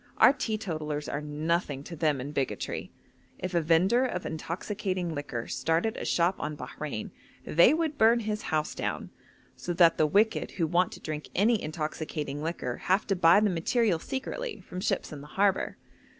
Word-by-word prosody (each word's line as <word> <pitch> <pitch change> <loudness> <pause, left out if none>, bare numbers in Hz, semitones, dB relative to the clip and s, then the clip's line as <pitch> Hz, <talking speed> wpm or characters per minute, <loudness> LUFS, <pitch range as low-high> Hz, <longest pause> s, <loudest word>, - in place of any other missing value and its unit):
Our - - +7
teetotalers 160 - -3
are 150 - -3
nothing 150 -1 -1
to 170 - -8
them 150 -3 +1
in 135 +3 -5
bigotry. 140 -3 -3 0.5
If 185 0 -4
a 170 - +3
vendor 180 +10 +3
of 185 -9 -2
intoxicating 180 +2 -3
liquor 140 -5 -4
started 165 +7 0
a - - -5
shop 175 +2 +2
on 150 0 -4
Bahrein, 145 -7 -5 0.3
they 170 +10 +6
would 315 -3 -1
burn 230 +2 +5
his 215 -1 -2
house 155 -1 0
down, - - -3 0.4
so 175 - -4
that 170 -1 +5
the 155 - +5
wicked 210 +8 +2
who 170 - 0
want 175 +2 +2
to - - -10
drink 155 -1 -5
any 220 +3 +3
intoxicating 155 -2 -4
liquor 155 -6 -3
have 190 +4 +1
to 195 - +1
buy 175 +2 +6
the 210 -2 +3
material 180 +2 +1
secretly 435 - -4
from 180 - -7
ships - - -1
in 145 - -7
the 145 - -11
harbour. 195 -1 +2
170 Hz, 175 wpm, -28 LUFS, 150-205 Hz, 0.5 s, Our